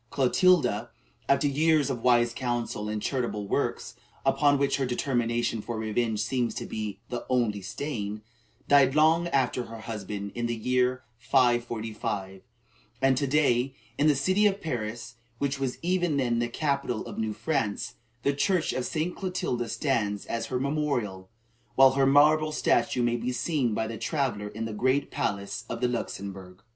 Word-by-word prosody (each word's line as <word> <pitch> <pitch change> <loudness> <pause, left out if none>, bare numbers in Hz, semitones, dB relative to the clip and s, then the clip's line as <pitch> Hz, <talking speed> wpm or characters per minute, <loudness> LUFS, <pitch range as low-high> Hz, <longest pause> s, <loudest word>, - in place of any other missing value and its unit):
Clotilda, 135 - +3 0.4
after 140 +1 +3
years 150 0 +3
of 120 -3 -4
wise 120 -1 +3
counsel 120 -4 -2
and 105 0 -2
charitable 120 -6 -2
works, - - -2 0.3
upon 145 +1 +4
which 140 0 +1
her 135 - 0
determination 120 -3 0
for 115 +1 -5
revenge 110 0 -1
seems 120 +1 -1
to - - -4
be 105 -2 -4
the 120 - -4
only 115 -5 +1
stain, 105 -1 -4 0.4
died 140 -1 +5
long 160 +3 +4
after 130 -5 0
her 115 0 -9
husband, 105 -2 -5
in 120 0 -2
the 120 - -1
year 125 +2 +1 0.2
545, 115 -6 0 0.6
and 135 0 +3
to 140 +2 0
day, 135 -2 +2 0.2
in 150 - +2
the 150 - +5
city 185 +9 +3
of 200 -1 -1
Paris, 115 - -4 0.2
which 140 +1 -1
was 130 -2 -2
even 175 -4 +1
then 120 -3 +1
the 120 0 0
capital 140 -4 -1
of - - -7
new 110 -1 -1
France, 110 -1 -2 0.3
the 140 - +2
church 175 +4 +1
of 130 - -2
St. 165 +2 -2
Clotilda 155 - -2
stands 110 -9 -1
as 115 -1 -3
her 125 - -2
memorial, 125 -10 -2 0.5
while 135 0 +7
her 135 0 +2
marble 155 +2 +5
statue 120 -4 +1
may 120 0 +1
be 120 +2 -2
seen 125 -2 0
by 110 - 0
the 110 -1 -6
traveller 120 -4 -1
in 110 +2 -5
the 110 - -4
great 130 +6 +1
palace 100 0 -2
of 115 - -4
the 125 - +2
Luxembourg. 95 -5 -5
125 Hz, 165 wpm, -27 LUFS, 110-140 Hz, 0.6 s, while